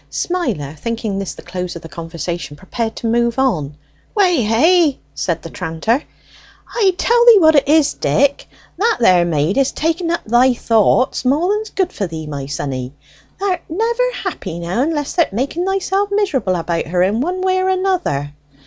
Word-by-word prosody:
Smiler, 235 Hz, -, -2 dB
thinking 225 Hz, -1 st, -3 dB
this 195 Hz, -, -5 dB
the -, -, -12 dB
close 180 Hz, -1 st, -5 dB
of 170 Hz, -, -9 dB
the -, -, -8 dB
conversation, 165 Hz, -1 st, -6 dB
prepared 220 Hz, +5 st, -4 dB
to -, -, -7 dB
move 235 Hz, +1 st, +1 dB
on. 160 Hz, -, 0 dB, 0.4 s
"Weh 360 Hz, -, +3 dB
hey!" 295 Hz, +8 st, +3 dB, 0.2 s
said 170 Hz, -2 st, -2 dB
the 165 Hz, -, -7 dB
tranter. 180 Hz, -, -1 dB, 0.7 s
"I 390 Hz, -6 st, +1 dB
tell 475 Hz, +3 st, +3 dB
thee 465 Hz, -3 st, +10 dB
what 315 Hz, -4 st, +6 dB
it 285 Hz, -2 st, +3 dB
is, 300 Hz, 0 st, +4 dB
Dick. 280 Hz, +1 st, +1 dB, 0.3 s
That 450 Hz, +3 st, +2 dB
there 180 Hz, -6 st, +4 dB
maid 165 Hz, -, 0 dB
is 275 Hz, -, +2 dB
taking 330 Hz, +2 st, -1 dB
up 340 Hz, -, -1 dB
thy 245 Hz, +3 st, +4 dB
thoughts 230 Hz, +2 st, +2 dB
more 305 Hz, +10 st, +2 dB
than's 430 Hz, +1 st, -3 dB
good 375 Hz, -2 st, -1 dB
for 200 Hz, -, -2 dB
thee, 160 Hz, -2 st, -6 dB
my 140 Hz, -2 st, -5 dB
sonny. 135 Hz, -2 st, -4 dB, 0.4 s
Thou'rt 380 Hz, -3 st, -1 dB
never 470 Hz, +8 st, 0 dB
happy 355 Hz, -, -5 dB
now 175 Hz, +7 st, -2 dB
unless 295 Hz, 0 st, -1 dB
th'rt 340 Hz, -, +1 dB
making 280 Hz, -, -2 dB
thyself 390 Hz, +1 st, 0 dB
miserable 365 Hz, -, 0 dB
about 170 Hz, -1 st, -2 dB
her 180 Hz, +2 st, +1 dB
in 205 Hz, +5 st, +1 dB
one 365 Hz, +5 st, -2 dB
way 375 Hz, 0 st, +2 dB
or 375 Hz, 0 st, +1 dB
another." 365 Hz, -, -1 dB
250 Hz, 175 wpm, -18 LUFS, -, 0.7 s, thee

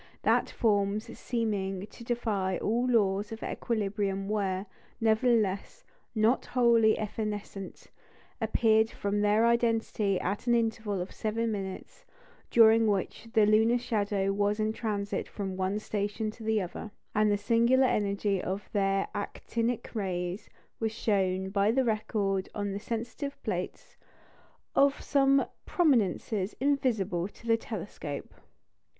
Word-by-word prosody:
That -, -, +3 dB
forms 205 Hz, -1 st, 0 dB
seeming 200 Hz, -5 st, -2 dB
to 215 Hz, +3 st, -13 dB
defy 215 Hz, -6 st, -1 dB
all 235 Hz, +4 st, 0 dB
laws 205 Hz, -3 st, +2 dB
of 225 Hz, -, -7 dB
equilibrium 200 Hz, -3 st, -2 dB
were, 195 Hz, -2 st, -1 dB, 0.3 s
nevertheless, 220 Hz, -, +1 dB, 0.3 s
not 220 Hz, +3 st, +3 dB
wholly 235 Hz, -3 st, +4 dB
evanescent, 210 Hz, -2 st, -5 dB, 0.6 s
appeared 220 Hz, 0 st, +3 dB
from 205 Hz, -1 st, -2 dB
their 210 Hz, +2 st, +4 dB
identity 225 Hz, -4 st, +1 dB
at 200 Hz, +6 st, -3 dB
an 240 Hz, -, +4 dB
interval 220 Hz, -4 st, -1 dB
of 180 Hz, -, -5 dB
seven 225 Hz, +1 st, -1 dB
minutes, 195 Hz, -2 st, -6 dB, 0.5 s
during 225 Hz, -1 st, +6 dB
which 205 Hz, +2 st, -1 dB
the 215 Hz, -1 st, +5 dB
lunar 220 Hz, +3 st, +4 dB
shadow 205 Hz, -4 st, 0 dB
was 205 Hz, +1 st, +1 dB
in 215 Hz, 0 st, +1 dB
transit 205 Hz, -3 st, -2 dB
from 195 Hz, -2 st, -4 dB
one 190 Hz, +2 st, -1 dB
station 210 Hz, +1 st, -2 dB
to 225 Hz, -, -16 dB
the 220 Hz, 0 st, +1 dB
other; 180 Hz, +4 st, -7 dB, 0.2 s
and 210 Hz, 0 st, +3 dB
the 205 Hz, -, +2 dB
singular 235 Hz, +5 st, +3 dB
energy 200 Hz, -4 st, 0 dB
of 195 Hz, +3 st, -4 dB
their 195 Hz, -1 st, +1 dB
actinic 230 Hz, +3 st, -3 dB
rays 185 Hz, -1 st, -3 dB, 0.3 s
was 225 Hz, -1 st, 0 dB
shown 190 Hz, -4 st, 0 dB
by 200 Hz, +1 st, +2 dB
the 260 Hz, +3 st, +2 dB
record 210 Hz, -3 st, -1 dB
on 205 Hz, -1 st, -2 dB
the 200 Hz, -, -3 dB
sensitive 235 Hz, +6 st, -4 dB
plates -, -, -4 dB, 0.8 s
of 280 Hz, 0 st, +4 dB
some 275 Hz, -1 st, +3 dB, 0.2 s
prominences 220 Hz, -, +1 dB
invisible 220 Hz, -10 st, 0 dB
in -, -, -10 dB
the 225 Hz, -, +5 dB
telescope. 190 Hz, -10 st, -6 dB
215 Hz, 130 wpm, -29 LUFS, 200-230 Hz, 0.8 s, during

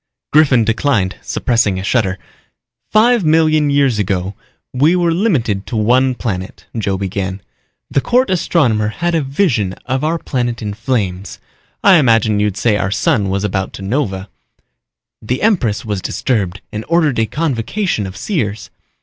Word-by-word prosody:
Griffin 140 Hz, -6 st, +5 dB
declined, 110 Hz, -4 st, 0 dB
suppressing 115 Hz, -6 st, 0 dB
a 95 Hz, -, -4 dB
shudder. 95 Hz, -3 st, 0 dB, 0.7 s
"Five 230 Hz, 0 st, +4 dB
million 155 Hz, -1 st, +3 dB
years 140 Hz, -6 st, +2 dB
ago 95 Hz, -1 st, -1 dB, 0.4 s
we 145 Hz, +7 st, +3 dB
were 175 Hz, -2 st, +2 dB
limited 125 Hz, -, 0 dB
to 115 Hz, -, -5 dB
one 125 Hz, +4 st, +2 dB
planet," 95 Hz, -7 st, -5 dB
Joe 100 Hz, -4 st, -1 dB
began. 95 Hz, 0 st, -3 dB, 0.5 s
"The 135 Hz, -, +2 dB
court 250 Hz, -, +2 dB
astronomer 130 Hz, -, +1 dB
had 175 Hz, +10 st, -2 dB
a 165 Hz, -, +2 dB
vision 135 Hz, -, 0 dB
of 130 Hz, +2 st, -2 dB
our 160 Hz, +2 st, +1 dB
planet 120 Hz, -6 st, -2 dB
in 105 Hz, -2 st, -4 dB
flames. 100 Hz, -5 st, -3 dB, 0.5 s
I 195 Hz, -3 st, +7 dB
imagine 115 Hz, -6 st, +3 dB
you'd 105 Hz, -1 st, 0 dB
say 110 Hz, -3 st, +2 dB
our 95 Hz, -, -1 dB
sun 105 Hz, -, +1 dB
was 100 Hz, +1 st, -1 dB
about 95 Hz, -2 st, -2 dB
to 95 Hz, -, -8 dB
nova. 95 Hz, -4 st, -2 dB, 0.9 s
The 125 Hz, -, -3 dB
empress 145 Hz, -, +1 dB
was 105 Hz, -3 st, -3 dB
disturbed 100 Hz, -6 st, -2 dB
and 105 Hz, +1 st, -5 dB
ordered 155 Hz, -7 st, +2 dB
a 110 Hz, -, +1 dB
convocation 145 Hz, -, -2 dB
of 95 Hz, -, -9 dB
seers. 110 Hz, -, -3 dB
115 Hz, 150 wpm, -16 LUFS, 100-150 Hz, 0.9 s, I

